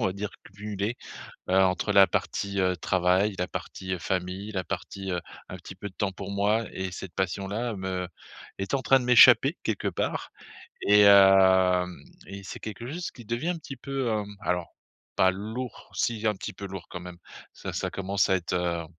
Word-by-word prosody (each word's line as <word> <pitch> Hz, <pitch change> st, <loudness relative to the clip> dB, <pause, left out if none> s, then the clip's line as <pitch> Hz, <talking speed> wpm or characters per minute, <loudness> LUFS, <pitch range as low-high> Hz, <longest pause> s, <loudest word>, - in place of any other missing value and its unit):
on -, -, +2 dB
va 95 Hz, -, -1 dB
dire, 105 Hz, +1 st, -5 dB
cumulés. 105 Hz, +3 st, -4 dB, 0.5 s
Heu, 95 Hz, -, +2 dB
entre 95 Hz, +2 st, +1 dB
la 100 Hz, -1 st, +7 dB
partie, 100 Hz, -1 st, -2 dB
heu, 90 Hz, 0 st, +2 dB
travail, 95 Hz, +4 st, +2 dB
la 90 Hz, -, 0 dB
partie, 95 Hz, 0 st, -6 dB
heu, 90 Hz, -, -2 dB
famille, 95 Hz, +4 st, -3 dB
la 95 Hz, -1 st, -1 dB
partie, 95 Hz, +3 st, -5 dB
heu, 90 Hz, -, -1 dB, 0.3 s
un 90 Hz, -, -6 dB
petit 90 Hz, +1 st, -11 dB
peu 100 Hz, +2 st, -7 dB
de -, -, -22 dB
temps 100 Hz, -2 st, -1 dB
pour 100 Hz, +1 st, -7 dB
moi, 105 Hz, +3 st, +1 dB
et 95 Hz, -1 st, -4 dB
cette 90 Hz, -1 st, -8 dB
passion-là 100 Hz, +5 st, -2 dB
me 95 Hz, -1 st, -3 dB, 0.5 s
est 95 Hz, +7 st, -4 dB
en 135 Hz, -, +2 dB
train 135 Hz, 0 st, +4 dB
de -, -, -5 dB
m'échapper 125 Hz, -2 st, +7 dB
quelque -, -, -2 dB
part, -, -, -3 dB, 0.5 s
et 105 Hz, +1 st, +5 dB
hem, 95 Hz, -2 st, +6 dB, 0.3 s
et 100 Hz, 0 st, -8 dB
c'est 90 Hz, -, -8 dB
quelque 110 Hz, +2 st, -7 dB
chose 175 Hz, +2 st, -4 dB
qui 120 Hz, -, -13 dB
devient 120 Hz, +10 st, -2 dB
un 180 Hz, -, -1 dB
petit 135 Hz, -4 st, -9 dB
peu, 135 Hz, -1 st, -3 dB
hem, 105 Hz, -2 st, -2 dB
alors 90 Hz, -1 st, -2 dB, 0.4 s
pas 95 Hz, 0 st, +4 dB
lourd, 110 Hz, +6 st, -6 dB
si 115 Hz, -2 st, -1 dB
un 105 Hz, -, +2 dB
petit -, -, -6 dB
peu 100 Hz, -, -8 dB
lourd 95 Hz, -2 st, -8 dB
quand 90 Hz, -, -6 dB
même, 90 Hz, -1 st, -9 dB, 0.4 s
ça -, -, -7 dB
ça -, -, -2 dB
commence 100 Hz, 0 st, 0 dB
à 95 Hz, -, +4 dB
être, 90 Hz, 0 st, -3 dB
heu, 85 Hz, -2 st, -1 dB
95 Hz, 200 wpm, -27 LUFS, 95-105 Hz, 0.5 s, la